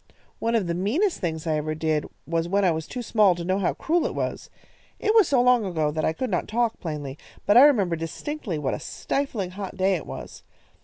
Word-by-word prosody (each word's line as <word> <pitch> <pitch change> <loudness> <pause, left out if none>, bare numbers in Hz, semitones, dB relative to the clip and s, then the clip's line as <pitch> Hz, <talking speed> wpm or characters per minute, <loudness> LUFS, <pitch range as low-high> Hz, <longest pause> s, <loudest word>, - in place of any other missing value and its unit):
One 230 +1 0
of 215 -5 +2
the 170 - -1
meanest 255 - 0
things 160 -3 -3
I 155 -2 +1
ever 155 +1 -2
did 155 -1 0 0.2
was 165 +1 -1
when 200 +1 +2
I 180 - +4
was 160 0 -3
too 250 -1 -5
small 210 -5 +4
to 170 0 -5
know 185 +2 +1
how 190 - 0
cruel 335 +1 +1
it - - -6
was. - - -3 0.5
It 430 - +1
was 440 -6 +6
so 270 - +3
long 245 -1 +4
ago 160 -6 0
that 155 +1 -2
I - - +2
could 250 +8 -3
not 180 - -1
talk 235 0 0
plainly, 150 -4 -5 0.3
but 205 - +4
I 245 - +10
remember 200 -12 +3
distinctly 175 - -4
what 140 -3 -1
a - - -3
stifling 235 -10 -3
hot 190 0 -7
day 190 +1 +2
it 170 - -3
was. - - -8
185 Hz, 230 wpm, -25 LUFS, 160-240 Hz, 0.5 s, I